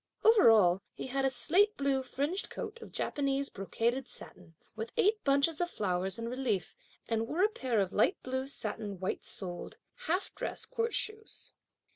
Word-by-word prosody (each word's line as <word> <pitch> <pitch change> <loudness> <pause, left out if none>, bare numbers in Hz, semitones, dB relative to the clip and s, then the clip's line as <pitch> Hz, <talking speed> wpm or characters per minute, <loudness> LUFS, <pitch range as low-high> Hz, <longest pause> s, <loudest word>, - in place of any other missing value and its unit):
Over 440 - +7
all, 195 -4 +5
he - - -5
had 270 +1 0
a - - +4
slate 350 - +5
blue 275 -1 +1
fringed 290 +9 -2
coat 470 - -6
of - - -10
Japanese 275 -1 -1
brocaded 235 +6 -1
satin, 170 -7 -10 0.2
with 225 +1 -5
eight 430 -1 +2
bunches 280 +4 +2
of 350 - 0
flowers 190 - -1
in 230 0 -4
relief; 235 -7 -2 0.3
and 225 0 -1
wore 335 +8 0
a 420 - +5
pair 255 - -1
of 195 -2 0
light 210 - +3
blue 260 +1 -3
satin 210 -6 -2
white 190 - -3
soled, 175 -3 -5 0.3
half 360 +5 0
dress - - -2
court 460 0 -2
shoes. 435 0 -3
260 Hz, 170 wpm, -31 LUFS, 215-330 Hz, 0.3 s, Over